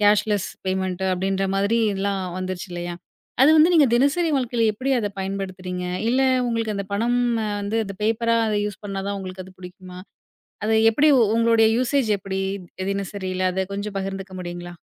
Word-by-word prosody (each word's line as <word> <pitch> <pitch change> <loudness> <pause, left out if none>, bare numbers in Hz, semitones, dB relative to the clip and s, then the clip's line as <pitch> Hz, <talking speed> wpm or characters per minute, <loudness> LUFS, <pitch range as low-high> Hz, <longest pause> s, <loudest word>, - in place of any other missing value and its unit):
Cashless 205 -1 +2 0.2
payment 190 0 -1
அப்படின்ற 190 +1 -1
மாதிரி 200 +4 +2 0.2
எல்லாம் 195 0 -1 0.2
வந்துருச்சு 185 0 -4
இல்லையா, 175 0 -4 0.5
அது 280 - +7
வந்து, 315 +3 +6
நீங்கத் 295 -8 +5
தினசரி 285 +7 +2
வாழ்க்கைல 245 -3 -1
எப்படி 260 +6 -3
அத 210 -3 -1
பயன்படுத்துறீங்க? 185 -2 -4 0.2
இல்ல 255 +3 +2 0.3
உங்களுக்கு 225 -2 -1
அந்தப் 200 0 -5
பணம் 235 +4 +1 0.4
வந்து 205 +3 -1
அந்த 200 -1 -7
பேப்பரா 230 +1 +2 0.3
யூஸ் 210 0 -6
பண்ணா 195 -1 -4
தான் 200 - -2
உங்களுக்கு 185 -1 -7
அது 185 - -14
பிடிக்குமா? 180 0 -11 0.7
அது 220 +1 +2 0.2
எப்படி 290 +7 +3 0.3
உங்களோட 230 -1 +4
யூசேஜ் 255 -1 +1
எப்படி 195 0 -4 0.5
தினசரில, 190 -1 -3
அது 190 +1 0
கொஞ்சம் 200 0 -4
பகிர்ந்துக்க 195 0 -5
முடியுங்களா? 175 0 -7
200 Hz, 155 wpm, -23 LUFS, 190-230 Hz, 0.7 s, அது